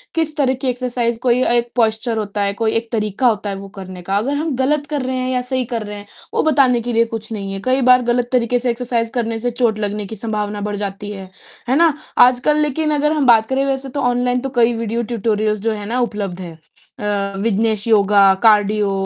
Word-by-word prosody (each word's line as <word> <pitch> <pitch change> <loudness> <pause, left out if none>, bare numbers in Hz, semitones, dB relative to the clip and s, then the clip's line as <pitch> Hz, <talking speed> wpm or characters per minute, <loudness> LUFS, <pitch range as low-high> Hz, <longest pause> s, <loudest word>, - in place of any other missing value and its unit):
किस 320 -2 0
तरीके 265 -1 0
एक्सरसाइज़ 245 -2 -2
कोई 250 +1 +3
एक 235 0 -1
पोस्चर 225 0 +1
होता 205 -1 -3
है, 200 0 0
कोई 220 +1 0
एक 225 +1 -2
तरीका 215 +2 0
होता 210 -2 0
है 195 - -3
वो 195 0 -8
करने 185 -1 -8
का, 195 +3 -1
अगर 270 +7 -1
हम 300 -2 -2
गलत 285 +3 0
कर 290 -3 -2
रहे 260 0 -2
हैं 255 0 -2
या 250 - 0
सही 255 0 -2
कर 230 -2 -3
रहे 205 0 -6
हैं 205 0 -11 0.3
वो - - +1
बताने 265 -6 +3
के 240 +1 -4
लिए 230 +1 +3
कुछ 225 0 -7
नहीं 200 -2 -4
है। 195 - -5
कई 260 +1 +2
बार 250 0 +6
गलत 240 0 0
तरीके 245 -1 +1
से 250 0 -1
एक्सरसाइज़ 235 -1 -1
करने 230 -2 -2
से 245 +1 -2
चोट 230 -3 0
लगने 205 0 -3
की 220 - -7
संभावना 210 -1 -3
बढ़ 205 0 -3
जाती 205 0 -5
है, 190 -2 -8 0.4
है 260 - +3
ना? 330 -1 +4 0.2
आजकल 255 +4 +4
लेकिन 305 +1 0
अगर 300 +1 +1
हम 300 -3 +1
बात 225 -2 +5
करें 270 +1 +1
वैसे 270 0 -2
तो 280 - -4
ऑनलाइन 245 0 +1
तो 270 - -3
कई 235 0 +4
वीडियो 230 +1 -2
ट्यूटोरियल्स 215 -2 -1
जो 225 0 0
है 205 -1 -6
ना 240 +4 -2
उपलब्ध 205 -6 -3
हैं। 165 -3 -9 0.4
अ, 200 -1 -2
विघ्नेश 220 0 0
योगा, 200 -2 +5
कार्डियो 210 -1 +4
230 Hz, 230 wpm, -18 LUFS, 210-255 Hz, 0.4 s, बार